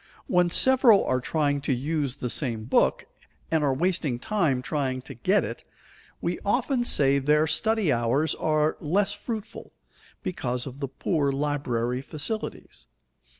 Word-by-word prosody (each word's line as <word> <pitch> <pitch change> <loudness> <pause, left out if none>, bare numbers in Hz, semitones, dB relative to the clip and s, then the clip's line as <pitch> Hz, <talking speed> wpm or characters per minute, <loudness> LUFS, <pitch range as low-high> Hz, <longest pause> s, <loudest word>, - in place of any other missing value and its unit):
When 180 -1 +2
several 250 +1 +5
are 130 0 0
trying 145 0 0
to 140 - -2
use 140 +1 -2
the 125 -3 -4
same 115 -7 -1
book, 115 - +1 0.5
and 160 -2 +2
are 140 - +2
wasting 155 -3 0
time 150 - 0
trying 130 -1 -2
to - - -9
get 185 - +1
it, - - -6 0.6
we - - -2
often 260 -4 +1
say 140 - +3
their 150 +3 +3
study 220 +2 +1
hours 120 +7 +1
are 155 0 0
less 195 +6 0
fruitful 215 0 -7 0.5
because 125 -8 -3
of 135 0 -9
the 140 - -3
poor 145 +1 -1
library 135 -4 -1
facilities. 150 - -6
150 Hz, 145 wpm, -26 LUFS, 130-180 Hz, 0.6 s, several